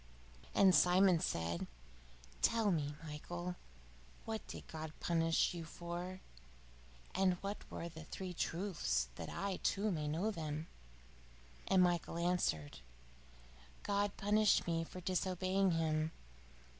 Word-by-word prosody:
And 190 -2 +7
Simon 180 0 +6
said, 85 - -1 0.7
"Tell 225 -3 +3
me, 145 -4 -1
Michael, 175 +4 -5 0.7
what 220 -1 -4
did - - -8
God 160 -1 -6
punish 165 +1 +2
you 170 -1 -5
for? 175 +3 -6 0.9
and 190 -1 +3
what 200 +1 -5
were 170 - -4
the 160 -1 -9
three 185 +2 -5
truths? 165 - 0
that - - -6
I, 195 -1 -2
too, 205 +2 +1
may 155 -4 -1
know 170 +9 0
them." 155 -4 -3 1.0
And 190 -1 +5
Michael 175 -1 +1
answered: 170 - 0 1.0
"God 205 0 0
punished 210 +1 +4
me 165 -1 0
for 180 +2 -8
disobeying 185 +1 +1
Him. 155 -1 +1
175 Hz, 120 wpm, -37 LUFS, 160-190 Hz, 1.0 s, And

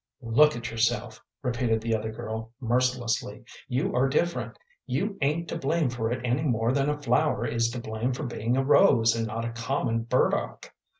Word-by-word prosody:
"Look 150 +7 +4
at 120 -1 -5
yourself," 115 0 -1 0.2
repeated 120 -3 0
the 115 +1 -2
other 110 0 -3
girl, 110 0 -6
mercilessly. 120 -3 -1 0.2
"You 135 +10 -1
are 130 +2 +3
different. 170 +5 -1 0.3
You 200 0 -1
ain't 155 +4 0
to - - -3
blame 145 -1 +1
for 115 -2 -2
it 125 0 -3
any 125 +4 +1
more 120 -5 +1
than 140 +1 +1
a 150 0 -2
flower 145 -5 +1
is 115 0 +1
to 120 - -5
blame 110 +2 -2
for 130 +4 -4
being 120 -1 -1
a 135 - +2
rose 115 -4 +5
and 115 -1 -1
not 115 +2 -4
a 115 - -3
common 120 -1 -1
burdock. - - 0
120 Hz, 185 wpm, -27 LUFS, 115-135 Hz, 0.3 s, rose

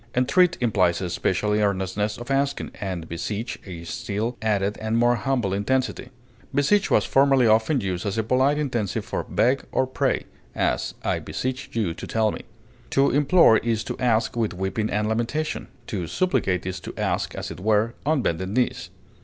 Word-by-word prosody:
Entreat 155 +8 +3
implies 95 -8 +2
a 90 -2 -3
special 105 +4 0
earnestness 105 0 0
of 120 +3 -7
asking, 140 +1 0
and 90 -5 -4
beseech, 105 +8 -4
a 85 -3 -7
still 115 +3 -3
added 105 -2 +1
and 110 +1 0
more 120 +1 +4
humble 125 -7 0
intensity; 130 +7 -1 0.5
beseech 195 +8 +3
was - - +3
formerly 135 -2 +4
often 110 +6 +3
used 90 -3 -2
as 100 - -2
a 110 - +1
polite 130 +5 +2
intensive 120 -9 -2
for - - -3
beg 130 +3 +1
or 130 - +2
pray; 130 - -1 0.3
as, - - 0
I - - 0
beseech 130 +1 -4
you 105 -8 0
to - - -8
tell 110 -1 +1
me. - - -6 0.5
To 135 +1 +3
implore 145 -3 +5
is 115 -1 -1
to - - -6
ask 120 -3 +1
with 110 -5 -1
weeping 95 +4 -2
and 105 +1 0
lamentation; 120 +8 -2 0.2
to 90 -5 -4
supplicate 95 - 0
is 95 0 -3
to - - -8
ask, - - -1
as - - -5
it - - -8
were, 110 +3 +2
on 150 -3 +1
bended 95 +3 -1
knees. 125 +4 -1
110 Hz, 175 wpm, -24 LUFS, 100-130 Hz, 0.5 s, implore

